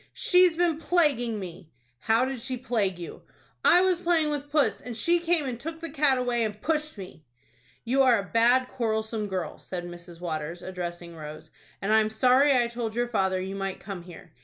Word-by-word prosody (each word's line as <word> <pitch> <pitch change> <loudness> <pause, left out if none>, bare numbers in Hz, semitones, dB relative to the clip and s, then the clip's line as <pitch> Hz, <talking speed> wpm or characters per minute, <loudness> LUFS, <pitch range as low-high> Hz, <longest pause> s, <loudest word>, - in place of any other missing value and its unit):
"She's 360 -2 +4
been 340 -3 +1
plaguing 280 -10 +1
me." 180 -3 -9 0.3
"How 225 - +2
did 260 -2 -4
she 255 +1 -3
plague 220 -7 -1
you?" 170 -1 -8 0.4
"I 355 - +6
was 370 -2 +2
playing 335 -4 +2
with 290 0 -4
puss, 295 -1 +2
and 240 -2 -7
she 340 +9 +2
came 335 -3 +1
and 245 -3 -4
took 325 +4 -6
the 330 -2 -6
cat 285 -3 +3
away, 245 -2 0
and 210 -1 -3
pushed 305 0 -2
me." 180 -5 -10 0.6
"You 260 +3 +2
are 255 -3 +5
a 200 - -2
bad, 245 +3 +4
quarrelsome 220 -2 -2
girl," 185 -5 -4
said 175 -2 -6
Mrs. 175 -1 -10
Waters, 165 0 -4
addressing 175 -2 -6
Rose, 155 -1 -9 0.3
"and 210 +2 +1
I'm 220 0 +4
sorry 255 +5 +4
I 250 -3 +4
told 235 -2 -4
your 240 0 0
father 190 -4 +1
you 190 +1 -4
might 195 -1 -4
come 195 -3 -7
here. 175 -1 -13
230 Hz, 195 wpm, -27 LUFS, 190-285 Hz, 0.6 s, I